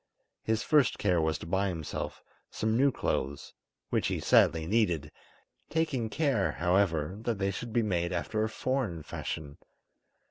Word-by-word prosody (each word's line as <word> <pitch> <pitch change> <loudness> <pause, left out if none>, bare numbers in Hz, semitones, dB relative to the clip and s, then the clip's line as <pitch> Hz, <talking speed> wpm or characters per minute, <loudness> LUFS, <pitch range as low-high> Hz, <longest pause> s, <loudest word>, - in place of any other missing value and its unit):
His 110 0 0
first 150 -5 +3
care 90 -5 +2
was 80 -1 +1
to - - -9
buy 95 +4 +1
himself 80 -5 -4 0.3
some 110 +1 -1
new 135 +3 +4
clothes, 70 - -2 0.4
which - - +1
he - - -1
sadly 80 -1 +4
needed, 85 -7 +1 0.6
taking 145 -8 0
care, 140 -7 +1
however, 90 -1 +1
that 115 -2 -1
they 95 0 0
should 115 +4 -6
be 120 0 +2
made 85 -4 0
after 100 +5 -1
a 110 - 0
foreign 110 - -2
fashion. 75 -1 -6
100 Hz, 150 wpm, -30 LUFS, 85-115 Hz, 0.6 s, new